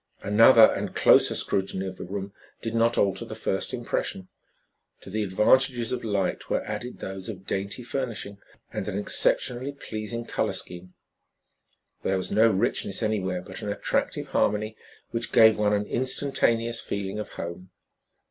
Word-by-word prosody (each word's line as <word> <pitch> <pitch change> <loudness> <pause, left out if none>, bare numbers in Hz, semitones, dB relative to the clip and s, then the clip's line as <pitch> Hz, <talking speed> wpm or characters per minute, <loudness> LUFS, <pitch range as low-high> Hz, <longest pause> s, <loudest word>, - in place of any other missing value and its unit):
Another 115 +3 +7
and - - -4
closer - - +5
scrutiny 95 0 -1
of 95 -1 -6
the - - -6
room 100 +1 -5 0.3
did 115 - -4
not 115 +1 +2
alter 100 -2 +1
the - - -7
first - - -2
impression. 95 -1 -3 0.7
To 95 - -11
the 110 +2 -1
advantages 120 +5 +2
of 125 - -3
light 100 -4 -1
were - - 0
added 110 +4 -5
those 95 +1 -6
of 95 -3 -8
dainty 100 +6 -3
furnishing 115 -5 -4 0.3
and - - -3
an 95 - -2
exceptionally 125 +5 +1
pleasing 115 -3 -5
color - - -1
scheme. 90 +1 -5 1.1
There 95 - 0
was 95 - -4
no 110 +3 +5
richness 100 +1 -1
anywhere, 95 -4 -1
but - - -9
an 105 - -4
attractive - - -2
harmony 105 +1 0 0.4
which 115 0 -2
gave 110 -1 +6
one 105 -1 +3
an 105 0 +1
instantaneous 120 -2 0
feeling 100 +1 -4
of 105 - -6
home. 85 +2 -7
105 Hz, 155 wpm, -26 LUFS, 95-115 Hz, 1.1 s, Another